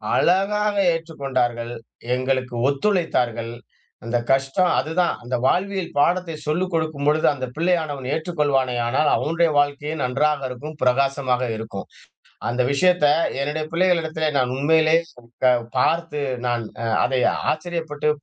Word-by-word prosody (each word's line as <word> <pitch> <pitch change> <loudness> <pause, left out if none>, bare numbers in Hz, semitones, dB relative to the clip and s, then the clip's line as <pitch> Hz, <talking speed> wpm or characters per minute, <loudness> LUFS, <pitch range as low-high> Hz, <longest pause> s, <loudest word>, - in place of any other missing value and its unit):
அழகாக 205 +3 +2 0.2
ஏற்றுக்கொண்டார்கள் 130 -7 -2 0.4
எங்களுக்கு 130 -1 -1
ஒத்துழைத்தார்கள். 135 - 0 0.5
அந்த 120 +1 0
கஷ்டம் 135 +7 +2
அதுதான் 170 +3 +1
அந்த 125 +1 -2
வாழ்வியல் 190 +4 0
பாடத்தை 175 +2 +1
சொல்லிக் 175 +5 -1
குடுக்கும்பொழுது 155 -2 +1
அந்த 130 -3 -4
பிள்ளைையானவன் 155 -5 -1
ஏற்றுக் 165 +1 -4
கொள்வானே 135 -4 +2
ஆனால், 140 +5 +2
அவனுடைய 165 +1 +1
வாழ்க்கையே 145 +1 0
நன்றாக 140 +3 +1
இருக்கும் 150 +5 -8
பிரகாசமாக 130 -1 +1
இருக்கும். 110 -3 -6 0.6
அந்த 125 +2 0
விஷயத்த 180 +3 +3 0.3
என்னுடைய 150 +3 -2
பிள்ளைகளிடத்திலே 165 -3 +1
நான் 125 -1 +1
உண்மையிலேயே 160 +3 +4 0.8
பார்த்து 165 +2 +1 0.2
நான் 120 -1 0 0.2
அ - - -2 0.2
அதை 130 0 0 0.3
ஆச்சரியப்பட்டு, 155 -2 -3
150 Hz, 110 wpm, -22 LUFS, 130-165 Hz, 0.8 s, உண்மையிலேயே